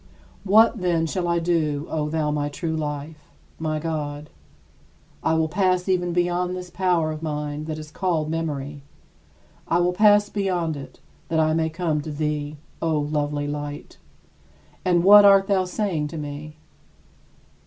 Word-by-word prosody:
What, 220 +3 +5
then, 170 -3 +1
shall 175 +2 -2
I 170 0 +1
do, 160 -4 0
O 150 -1 -2
thou 155 -1 0
my 145 -1 -1
true 160 +2 -3
life, 150 0 -5 0.3
my 155 -1 -1
God? 150 -2 -4 0.9
I 160 - +1
will 160 0 +2
pass 185 +1 +1
even 180 -2 +1
beyond 175 +1 0
this 180 -1 -7
power 175 -4 +1
of 155 0 -6
mine 150 -1 -4
that 155 -1 -4
is 155 -1 -9
called 165 -5 -1
memory 150 -3 -4 0.9
I 170 - +2
will 175 +1 +2
pass 205 +1 +5
beyond 180 -6 -1
it, 135 -2 -10 0.3
that 160 - 0
I 155 0 +3
may 160 0 +1
come 160 -2 -1
to 155 - -7
thee, 150 0 -3 0.2
O 160 -2 +1
lovely 145 0 -1
Light. 145 0 -6 0.8
And 175 -2 +2
what 205 +2 +9
art 195 -1 +7
thou 195 -2 +1
saying 180 -5 -2
to 160 - -7
me? 150 +1 -7
160 Hz, 155 wpm, -23 LUFS, 150-180 Hz, 0.9 s, what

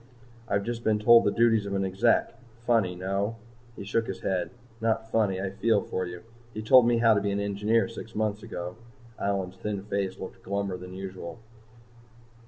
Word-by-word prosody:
"I've 100 -1 0
just 115 +1 -4
been 110 -1 +3
told 115 +2 +6
the 100 - +3
duties 115 -2 +3
of 100 - -2
an 95 0 0
Exec. 95 +5 +2 0.3
Funny 110 -7 +2
no?" 100 +4 -2 0.4
He - - -7
shook 115 +3 0
his 95 - -5
head. 95 -2 -1 0.3
"Not 110 0 0
funny. 100 -4 +2
I 95 0 -3
feel 110 +1 +2
for 95 -1 -3
you. 90 0 -8 0.3
He 110 - -4
told 120 +2 +7
me 120 -1 +3
how 115 -1 +5
to 100 - +1
be 100 - -1
an 100 0 -1
engineer 105 +3 +1
six 115 0 -9
months 105 0 -1
ago." 90 -4 -6 0.4
Allyn's 95 -2 -2
thin 105 -2 -4
face 100 -2 -2
looked 95 - -8
glummer 100 -2 -3
than 90 0 -9
usual. 95 -1 -7
100 Hz, 190 wpm, -27 LUFS, 95-115 Hz, 0.4 s, told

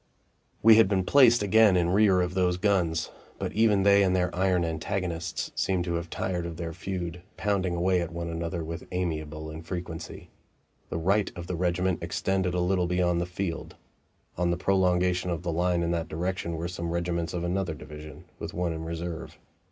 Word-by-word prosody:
We 110 0 +8
had 115 - +6
been 95 -1 +1
placed 120 -1 +6
again 105 -1 +5
in 85 0 +2
rear 95 -2 +4
of 90 0 -1
those 90 -1 +1
guns, 90 -5 +1 0.3
but - - -4
even 105 -3 +3
they 100 0 +6
and 95 -1 +3
their 90 -1 0
iron 90 -1 +2
antagonists 85 0 -3
seemed 95 -2 0
to 85 - -2
have 85 0 -3
tired 90 -2 -2
of 85 -1 -7
their 85 -1 -4
feud, 90 -1 -5 0.2
pounding 95 -4 0
away 90 +1 +2
at 85 0 -4
one 85 0 -4
another 85 +1 -3
with 80 +1 -6
amiable 80 -3 -3
infrequency. 85 +1 -7 0.6
The - - -3
right 95 +5 +1
of 85 - -6
the 90 - -3
regiment 90 +1 0
extended 90 +2 -1
a 90 - +1
little 90 0 +1
beyond 90 -1 +1
the 85 - -2
field. 90 -2 -4 0.6
On 90 -1 +2
the 85 - 0
prolongation 90 -1 +2
of 85 -1 -3
the 85 - -1
line 90 +1 +1
in 85 - 0
that 85 -1 -1
direction 85 +1 -2
were 85 +2 -3
some 85 -1 -4
regiments 85 0 -1
of 85 - -2
another 90 -1 -1
division, 75 0 -10 0.2
with - - -6
one 90 -1 -1
in 80 0 -5
reserve. 85 0 -5
90 Hz, 190 wpm, -27 LUFS, 85-95 Hz, 0.6 s, We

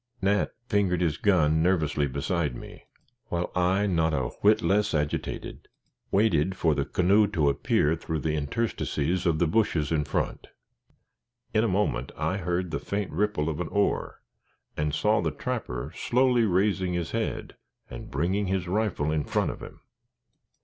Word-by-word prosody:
Nat 100 +1 +1 0.2
fingered 100 -6 +1
his 80 -4 0
gun 80 -6 +3
nervously 80 -5 +1
beside 70 +1 -1
me, - - -11 0.4
while 85 0 -2
I, 90 +3 +2
not 80 -5 +1
a 65 -2 -1
whit 105 0 +4
less 100 +3 +2
agitated, 75 -1 -3 0.4
waited 95 -3 +2
for 80 -2 +2
the 70 -1 -1
canoe 100 +7 +3
to 80 -8 +1
appear 75 +2 +1
through 80 -1 -4
the 80 - -1
interstices 85 +1 -1
of 80 -2 +2
the 85 - +2
bushes 80 -4 +1
in 75 -2 +2
front. - - -3 1.1
In 110 0 +3
a - - +2
moment, 95 - 0
I 95 - -1
heard 90 -1 -2
the - - -2
faint 100 -1 -3
ripple 95 -4 0
of 80 -1 -2
an 90 - -2
oar, 100 +4 -1 0.5
and 75 0 -1
saw - - +2
the - - 0
trapper 65 +4 -4
slowly 125 -1 +2
raising 95 -1 +1
his 85 -2 -2
head - - -3 0.3
and - - -9
bringing 95 +8 0
his 95 -1 -1
rifle 95 -6 0
in 75 -1 0
front - - 0
of - - -10
him. - - -11
90 Hz, 160 wpm, -27 LUFS, 75-100 Hz, 1.1 s, whit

